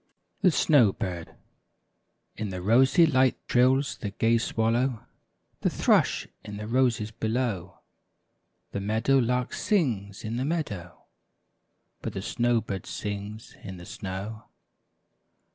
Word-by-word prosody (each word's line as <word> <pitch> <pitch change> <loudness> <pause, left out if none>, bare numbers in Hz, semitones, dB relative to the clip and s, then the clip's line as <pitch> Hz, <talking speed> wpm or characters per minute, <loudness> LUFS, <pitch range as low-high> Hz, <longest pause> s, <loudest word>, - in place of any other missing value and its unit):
THE 185 - +6
SNOW 140 - +4
BIRD. 85 -3 -5 1.0
TN 105 -1 -2
the 90 -1 -5
rosy 130 - +5
light 130 -4 +3
trills 130 +3 +3
the 105 - -3
gay 115 +3 +2
swallow, 115 +2 +1
^ 125 -5 -6 0.6
The - - +1
thrush, - - +2 0.2
in 105 -1 -7
the 105 - -5
roses 115 -2 +1
below; 110 -7 -2 0.9
The - - -3
meadow 110 +7 +2
lark 125 0 0
sings 115 - 0
in 110 +2 -3
the 125 - -1
meadow. 105 - -4 1.0
But - - -4
the - - -4
snow 120 -1 +1
bird 95 -4 -5
sings 105 +1 -6
in 95 -3 -8
the 90 - -10
snow. 100 +4 -6
110 Hz, 125 wpm, -27 LUFS, 100-125 Hz, 1.0 s, THE